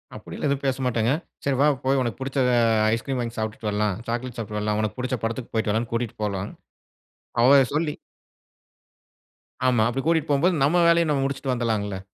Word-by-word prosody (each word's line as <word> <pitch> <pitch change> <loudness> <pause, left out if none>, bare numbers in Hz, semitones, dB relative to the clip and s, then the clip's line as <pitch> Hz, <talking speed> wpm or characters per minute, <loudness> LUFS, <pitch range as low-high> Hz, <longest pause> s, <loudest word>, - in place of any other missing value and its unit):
அப்படியெல்லாம், - - -5
எதுவும் 140 0 -1
பேசமாட்டேங்க. 125 -3 0 0.3
சரி 140 -2 0
வா, 150 - +5 0.2
போய் 135 0 +3
உனக்கு 120 0 -3
புடுச்ச 135 +1 -4 0.6
ஐஸ்கிரீம் 130 +3 -2
வாங்கி 115 -1 -5
சாப்பிட்டுட்டு 110 0 -3
வரலாம். 105 -1 0
சாக்லேட் 120 +1 -3
சாப்பிட்டுட்டு 105 -2 -4
வரலாம். 105 0 0
உனக்கு 110 +2 -3
புடுச்ச 130 0 -1
படத்துக்கு 115 +2 -3
போய்ட்டு 110 -2 0
வரலானு 115 +2 -1
கூட்டிட்டு 115 -1 -2
போலாம். 100 -1 -3 0.9
அவ 135 +4 +7 0.2
சொல்லி 155 -1 0 1.8
ஆமா. 120 -4 +3
அப்படி 130 +3 -2
கூடிட்போம்போது, 165 +1 +2
நம்ம 170 +5 +3
வேலய, 170 0 +4
நம்ம 140 -2 +1
முடுச்சுட்டு 135 -1 -2
வந்துடாளங்கள! 105 -5 -2
120 Hz, 160 wpm, -24 LUFS, 110-135 Hz, 1.8 s, அவ